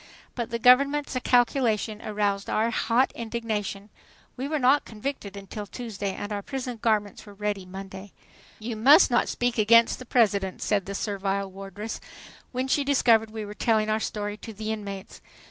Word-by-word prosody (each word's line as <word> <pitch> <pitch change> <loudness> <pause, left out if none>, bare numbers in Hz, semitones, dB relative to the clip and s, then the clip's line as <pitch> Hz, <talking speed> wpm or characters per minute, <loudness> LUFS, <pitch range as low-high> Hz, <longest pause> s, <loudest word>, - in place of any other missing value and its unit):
But 235 -2 -4
the 235 - -2
government's 280 +4 +4
calculation 235 -3 +2
aroused 205 -2 -1
our 225 +2 +1
hot 235 +3 +2
indignation. 220 -3 -4 0.4
We 265 +2 -4
were 310 +1 -1
not 275 +2 +4
convicted 215 -3 -6
until 200 +1 -7
Tuesday 205 -5 -5
and 205 +1 -5
our 205 - -3
prison 255 -1 -5
garments 210 -3 0
were 205 - -12
ready 205 -2 -3
Monday! 195 +1 -9 0.5
"You 225 +1 -5
must 275 - +6
not 240 - +2
speak 245 -1 -1
against 230 +2 +5
the 255 - -9
President," 200 -6 +2
said 200 -3 0
the 200 - -4
servile 195 -1 -2
wardress, 195 +3 -7 0.5
when 255 +1 -2
she 285 +2 +2
discovered 235 -5 +3
we 215 -1 -6
were 205 - -7
telling 215 0 +1
our 215 - +1
story 205 -1 -4
to 225 - -9
the 215 +1 -4
inmates. 200 -3 -7
215 Hz, 165 wpm, -26 LUFS, 205-245 Hz, 0.5 s, must